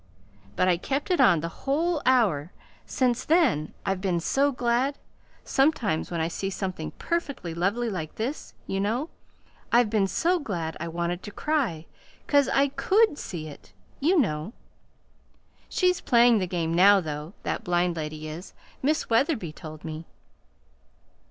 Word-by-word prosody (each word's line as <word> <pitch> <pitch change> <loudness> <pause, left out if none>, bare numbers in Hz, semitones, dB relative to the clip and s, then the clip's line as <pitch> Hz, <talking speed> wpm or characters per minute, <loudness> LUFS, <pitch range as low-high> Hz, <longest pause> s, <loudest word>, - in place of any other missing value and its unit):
But 185 - +2
I 180 -2 +3
kept 275 - -2
it 360 - +3
on 175 -5 +5
the 165 - -2 0.2
whole 320 +2 +1
hour. 200 - +3 0.4
Since 250 -1 +1
then 295 - +2
I've 195 -1 -1
been 185 -3 0
so 275 +11 +2
glad, 250 +2 0 0.5
sometimes 260 - +1
when 170 - -3
I 160 - +1
see 195 +3 -3
something 185 -4 -4
perfectly 280 - -3
lovely 200 +8 0
like 180 -8 -4
this, 250 +7 -4
you 195 - -2
know 235 +10 -1 0.6
I've 235 -2 +4
been 205 -3 +2
so 350 - +1
glad 170 - -4
I 170 - -4
wanted 170 +2 -2
to 205 - -8
cry; 235 - -1 0.4
'cause 285 -2 +3
I 275 +1 +3
COULD 400 +3 +2
see 160 -4 -6
it, 145 - -13 0.3
you 340 +7 +3
know. 170 - -1 1.2
She's 360 -1 +1
playing 235 -2 +5
the 185 - -1
game 170 -2 -1
now, 195 +4 +6
though 155 0 -5
that - - -2
blind 175 0 +1
lady 155 -1 -5
is. 160 +5 -8 0.3
Miss 305 +4 +1
Wetherby 230 - +1
told 155 0 -10
me." 160 0 -6
200 Hz, 150 wpm, -26 LUFS, 170-275 Hz, 1.2 s, now